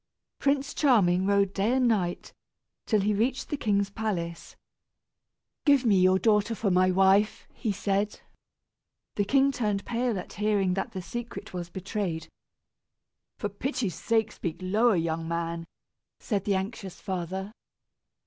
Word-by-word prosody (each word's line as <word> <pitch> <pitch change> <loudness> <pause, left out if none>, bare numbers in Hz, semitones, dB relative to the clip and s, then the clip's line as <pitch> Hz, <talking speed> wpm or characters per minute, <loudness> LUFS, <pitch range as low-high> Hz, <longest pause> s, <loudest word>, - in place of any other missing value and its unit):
Prince 280 0 +1
Charming 190 - +3
rode, 200 -1 +2
day 205 +5 +1
and 260 -1 +3
night, 190 -7 -1 0.5
till 215 -3 +3
he 210 +2 +1
reached 245 +6 0
the - - -1
king's 200 -6 0
palace. 180 -6 -4 1.1
"Give 280 -3 +4
me 200 -5 +4
your 185 +1 +5
daughter 210 +2 +2
for 205 -3 0
my 185 +1 +4
wife," 195 +3 +3
he 225 - -2
said. 200 +1 -1 0.9
The 205 - +1
king 275 +5 +4
turned 210 -6 -1
pale 240 -2 -1
at 180 - -7
hearing 205 -2 +1
that 195 +1 -3
the 185 - -5
secret 225 -2 -7
was 175 -1 -5
betrayed. 180 -3 -4 1.1
"For 205 - -2
pity's 205 - -2
sake 225 -1 0
speak 170 -5 -4
lower, 210 +5 +3
young 165 -1 -1
man," 170 0 -3 0.5
said 200 -4 -2
the 200 - +2
anxious 190 -1 -4
father. 190 +1 -4
200 Hz, 140 wpm, -28 LUFS, 185-225 Hz, 1.1 s, your